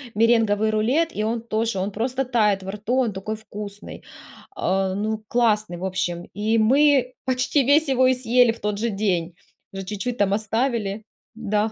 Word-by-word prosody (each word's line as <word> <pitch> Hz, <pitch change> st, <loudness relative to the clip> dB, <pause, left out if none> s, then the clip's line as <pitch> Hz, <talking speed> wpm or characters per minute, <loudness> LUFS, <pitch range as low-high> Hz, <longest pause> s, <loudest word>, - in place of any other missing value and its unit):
меренговый 220 Hz, -1 st, +3 dB
рулет, 265 Hz, +10 st, +1 dB
и 210 Hz, -, -1 dB
он 225 Hz, +1 st, -1 dB
тоже, 225 Hz, -2 st, -2 dB
он 190 Hz, +2 st, -2 dB
просто 255 Hz, +6 st, -2 dB
тает 210 Hz, -6 st, +1 dB
во 190 Hz, -, -5 dB
рту, 215 Hz, +4 st, -3 dB
он 245 Hz, -5 st, +1 dB
такой 195 Hz, +3 st, -4 dB
вкусный, 210 Hz, -1 st, -9 dB, 0.5 s
а, 190 Hz, 0 st, 0 dB
ну, 215 Hz, +1 st, -2 dB
классный, 215 Hz, -6 st, +1 dB
в 185 Hz, -, -5 dB
общем, 175 Hz, -2 st, -2 dB
и 215 Hz, +2 st, 0 dB
мы 260 Hz, +2 st, +3 dB
почти 260 Hz, +2 st, +1 dB
весь 290 Hz, +4 st, +4 dB
его 260 Hz, -1 st, +3 dB
и 260 Hz, -, +3 dB
съели 245 Hz, -1 st, +3 dB
в 230 Hz, -, -10 dB
тот 210 Hz, 0 st, -2 dB
же 235 Hz, +2 st, 0 dB
день, 180 Hz, -5 st, -1 dB, 0.4 s
уже 195 Hz, 0 st, -6 dB
чуть-чуть 210 Hz, +5 st, -4 dB
там 200 Hz, -1 st, +2 dB
оставили, 220 Hz, -1 st, -1 dB, 0.3 s
да. 215 Hz, -1 st, -1 dB
220 Hz, 175 wpm, -23 LUFS, 205-245 Hz, 0.5 s, весь